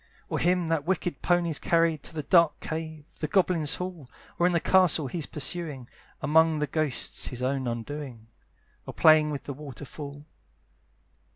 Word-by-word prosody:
"Or - - -1
him 180 0 +2
that 165 -3 +1
wicked 180 -5 -1
pony's 175 -3 +1
carried 165 -3 +2
"To 160 - -11
the 150 - -3
dark 170 +1 +4
cave, 160 -1 -5
the 155 - -2
goblins' 170 -3 +2
hall, 180 -7 -6 0.3
"Or 175 - +4
in - - +2
the 170 - +2
castle 180 -4 +3
he's 150 +4 -4
pursuing, 150 -4 -4 0.4
"Among 160 +1 +4
the 150 - 0
ghosts, 150 -2 -1
his 125 0 -5
own 130 0 -1
undoing; 120 0 -5 0.6
"Or - - -7
playing 155 -1 +6
with 145 -2 -4
the 140 - -5
waterfall." 145 +1 -9
155 Hz, 160 wpm, -27 LUFS, 140-170 Hz, 0.6 s, playing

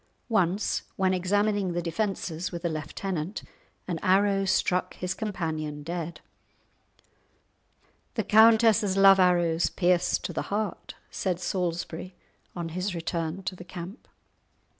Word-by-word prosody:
Once 195 -2 +1
when 190 -1 +2
examining 200 +1 +1
the 175 - -1
defences 175 -2 -2
with 170 -1 -6
a - - +2
lieutenant, 160 +3 -4 0.4
an 170 -3 -2
arrow 195 +1 +3
struck 185 -1 +1
his 180 0 -3
companion 155 -8 -4
dead. 170 +1 -5 1.9
"The - - 0
countess's 220 -2 +5
love 195 0 +7
arrows 175 -2 +3
pierce 180 -1 +2
to - - -6
the - - -1
heart," 210 0 -3 0.2
said 180 -3 -2
Salisbury, 175 -1 -3 0.4
on 170 -2 -4
his 185 +3 -3
return 165 +2 -3
to 185 - -3
the 180 - -10
camp. 180 +5 -9
180 Hz, 120 wpm, -27 LUFS, 170-195 Hz, 1.9 s, love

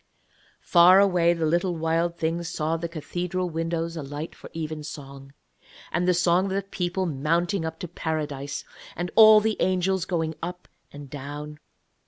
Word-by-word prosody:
Far 180 +2 +7
away 180 -4 +4
the 165 -2 -1
little 175 +3 +1
Wild 165 +1 0
Thing 165 +1 -1
saw 165 -1 -2
the 165 +1 -4
cathedral 175 +2 -3
windows 165 +1 -2
alight 145 +1 -6
for - - -12
evensong, 145 -4 -7 0.6
and 180 - 0
the 180 - +5
song 175 +1 +3
of 190 - -2
the 195 0 -1
people 185 -1 -2
mounting 170 +5 0
up 160 0 -5
to 175 - -4
Paradise, 150 -4 -4 0.3
and 175 +1 -4
all 215 -1 +9
the 215 0 -1
angels 185 0 +1
going 160 -3 -1
up 180 +1 -6 0.2
and 145 -1 -10
down. 145 +2 -7
170 Hz, 155 wpm, -25 LUFS, 155-180 Hz, 0.6 s, all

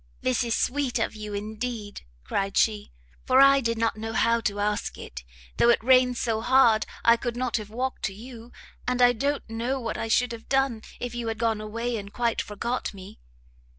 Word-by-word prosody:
"This 255 -1 +1
is 235 -1 0
sweet 270 -2 0
of 225 - -1
you 210 -1 -6
indeed," 215 0 -5 0.2
cried 195 - -2
she, 210 -2 +1 0.3
"for 260 +1 +4
I 275 0 +7
did 230 -2 -1
not 225 -1 0
know 225 +1 -5
how 230 +1 +2
to 205 -2 -2
ask 210 0 -1
it, 65 -1 -9 0.3
though 235 - +4
it 235 - +3
rains 255 -1 +4
so 225 -2 -1
hard 235 -3 +4 0.2
I 235 - +7
could 240 0 -4
not 250 -2 0
have 210 -2 -7
walked 255 +4 -3
to 200 - -3
you, 235 +1 -11 0.4
and 250 0 0
I 245 0 +6
don't 280 +5 -2
know 235 +4 -2
what 230 -3 -4
I 225 - -2
should 245 +2 +2
have 230 -1 -9
done, 270 -4 +1 0.2
if 245 -1 -4
you 240 -1 -4
had 225 -1 -2
gone 225 -2 0
away 230 +2 -3
and 200 -1 -8
quite 235 0 0
forgot 235 +2 -4
me." 195 +2 -12
230 Hz, 205 wpm, -26 LUFS, 215-250 Hz, 0.4 s, I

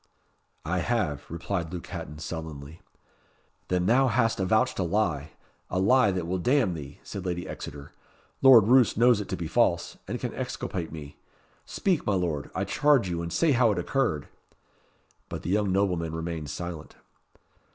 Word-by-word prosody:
"I 90 +3 0
have," 90 - -1
replied 85 0 -3
Luke 90 -2 -6
Hatton, 75 +2 -7
sullenly. 80 -1 -7 0.9
"Then 90 -1 0
thou 130 +6 +4
hast 115 -2 +1
avouched 110 +7 +1
a - - +2
lie 85 -6 -1 0.4
a - - -2
lie 125 +4 +4
that 90 -3 -2
will 90 +2 -2
damn 125 -1 +2
thee," 70 -3 -8
said 95 - -6
Lady 90 -1 -3
Exeter. 70 0 -8 0.5
"Lord 125 -6 +8
Roos 125 -3 +5
knows 120 -2 +5
it 100 - -8
to 95 - -2
be 85 - -4
false, - - +1
and - - -3
can - - -4
exculpate 85 -4 -4
me. 75 -3 -9 0.5
Speak, 185 -6 0
my 100 - +1
Lord, 85 -6 -2
I - - 0
charge 145 -9 +3
you, 85 -1 -2
and 85 0 -5
say 160 - +2
how 120 -4 +4
it 100 - -2
occurred." 90 - 0 1.0
But - - -6
the 85 - -2
young 105 -1 +1
nobleman 90 -4 0
remained 80 -2 -4
silent. 85 -2 -6
90 Hz, 165 wpm, -27 LUFS, 80-115 Hz, 1.0 s, Lord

